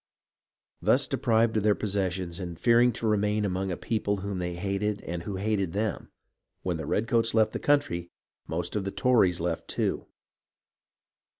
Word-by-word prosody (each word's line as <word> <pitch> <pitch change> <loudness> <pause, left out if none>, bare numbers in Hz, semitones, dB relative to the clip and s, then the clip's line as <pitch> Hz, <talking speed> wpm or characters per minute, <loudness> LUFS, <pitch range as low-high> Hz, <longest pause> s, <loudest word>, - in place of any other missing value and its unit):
Thus - - +4
deprived 110 -1 +2
of - - +2
their 105 -1 +4
possessions 95 -3 -2
and 85 -3 -6
fearing 120 +4 +5
to 115 - -5
remain 105 0 +1
among 95 0 -1
a 90 - -3
people 105 -3 -1
whom 100 -1 -4
they 90 -1 -3
hated 100 +3 -2
and 85 0 -5
who 100 +3 -5
hated 100 -3 -1
them, 105 -1 -2 0.5
when 90 -3 -1
the 80 -2 -5
redcoats 115 +1 +1
left 110 -1 +4
the - - -2
country, 85 -12 +1 0.4
most 85 +2 -2
of 105 - 0
the 100 - -2
Tories 105 -7 +3
left 85 0 -2
too. - - -1
100 Hz, 165 wpm, -28 LUFS, 90-110 Hz, 0.5 s, fearing